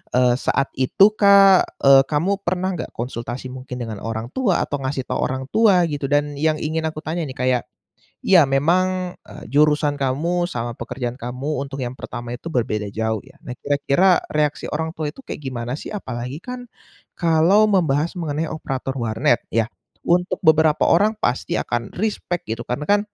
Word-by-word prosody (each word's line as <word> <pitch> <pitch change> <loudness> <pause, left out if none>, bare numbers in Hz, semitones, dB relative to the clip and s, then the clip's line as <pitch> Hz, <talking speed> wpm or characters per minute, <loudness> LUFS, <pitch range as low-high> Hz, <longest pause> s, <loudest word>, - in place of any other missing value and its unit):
eee, 125 0 +3
saat 135 0 0
itu 195 +11 +5
Kak, 200 -2 +5
eee, 135 0 +8
kamu 180 +8 0
pernah 185 +1 0
nggak 175 - -6
konsultasi 120 +1 -5
mungkin 130 0 -8
dengan 115 -4 -5
orang 115 +2 -5
tua, 215 - +1
atau 145 - -4
ngasih 130 0 -3
tau - - -3
orang 130 +1 -3
tua 205 -5 +4
gitu? 145 -4 -2
Dan 145 0 0
yang 155 +1 +2
ingin 160 +1 -2
aku 155 0 -6
tanya 160 0 -3
nih 130 - -8
kayak, 125 -1 +1 0.6
iya 170 -8 +6
memang, 180 +6 +1
eee, - - -12
jurusan 150 0 +3
kamu 170 +7 0
sama 120 -5 -4
pekerjaan 120 +2 -5
kamu 130 +5 -3
untuk 140 0 -5
yang 120 - -4
pertama 120 -2 -7
itu 125 +7 -7
berbeda 110 -7 -1
jauh 110 +1 -2
ya, - - -19
nah 130 - -6
kira-kira 145 +7 +2 0.2
reaksi 150 -1 0
orang 160 +1 -2
tua 150 -2 -3
itu - - -13
kayak - - -7
gimana 125 -1 -4
sih? - - -8
Apalagi 125 - -5
kan, 250 0 -7 0.5
kalau 170 +5 +4
membahas 165 -6 +1
mengenai 160 -3 -2
operator 135 -4 -4
warnet 115 -1 +1
ya 115 -1 +1 0.4
untuk 180 +1 +1
beberapa 155 -1 +4
orang 210 +5 +3
pasti 125 - -1
akan 120 -1 -3
respek 185 -3 -2
gitu 120 - -7
karena 135 +5 -3
kan, 205 0 +4
145 Hz, 175 wpm, -21 LUFS, 125-175 Hz, 0.6 s, eee